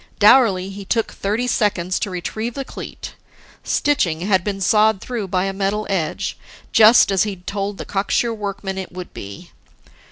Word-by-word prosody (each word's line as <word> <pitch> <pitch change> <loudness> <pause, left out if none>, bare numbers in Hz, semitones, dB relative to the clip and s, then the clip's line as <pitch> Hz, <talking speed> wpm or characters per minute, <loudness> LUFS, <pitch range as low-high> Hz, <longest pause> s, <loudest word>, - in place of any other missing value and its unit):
Dourly, 205 -4 +5
he 200 +1 -8
took 225 +3 -1
thirty 210 +5 -2
seconds 190 -7 0
to 205 - -2
retrieve 215 +6 -4
the 275 - -4
cleat; - - -8 0.5
stitching 180 - +1
had 190 -1 +2
been 200 -1 -3
sawed 215 +1 +3
through 230 -4 -4
by 185 0 0
a 195 - -2
metal 200 +2 -1
edge 165 -5 -2 0.3
just 220 -1 +7
as 190 -2 +2
he'd 195 -4 -3
told 200 0 -3
the - - -6
cocksure 205 +4 0
workman 200 -2 -4
it 190 - -7
would 180 0 -8
be. 100 0 -9
200 Hz, 165 wpm, -20 LUFS, 185-215 Hz, 0.5 s, just